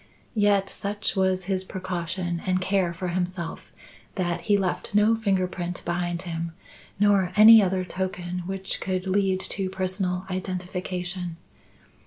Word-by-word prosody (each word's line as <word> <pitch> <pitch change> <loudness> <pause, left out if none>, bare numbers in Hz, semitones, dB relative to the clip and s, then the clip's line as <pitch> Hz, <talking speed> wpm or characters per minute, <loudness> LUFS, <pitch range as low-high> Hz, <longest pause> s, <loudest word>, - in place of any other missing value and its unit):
Yet 205 -2 +3
such 205 +2 -2
was 190 -1 +2
his 190 0 -1
precaution 180 -2 -3
and 185 0 +2
care 185 -1 +1
for 175 +2 -4
himself 180 -1 -3 0.4
that 175 -3 -1
he 205 -2 +3
left 195 +1 -2
no 210 +2 +5
finger 195 -4 +1
print 180 -1 -4
behind 175 0 -2
him 165 -1 -4 0.5
nor 200 -3 +4
any 220 +1 +10
other 185 -1 0
token 180 -1 -3
which 190 0 -3
could 185 -1 -2
lead 190 0 +1
to 190 0 -1
personal 185 -1 -2
identification. 180 -1 -4
185 Hz, 135 wpm, -26 LUFS, 180-195 Hz, 0.5 s, any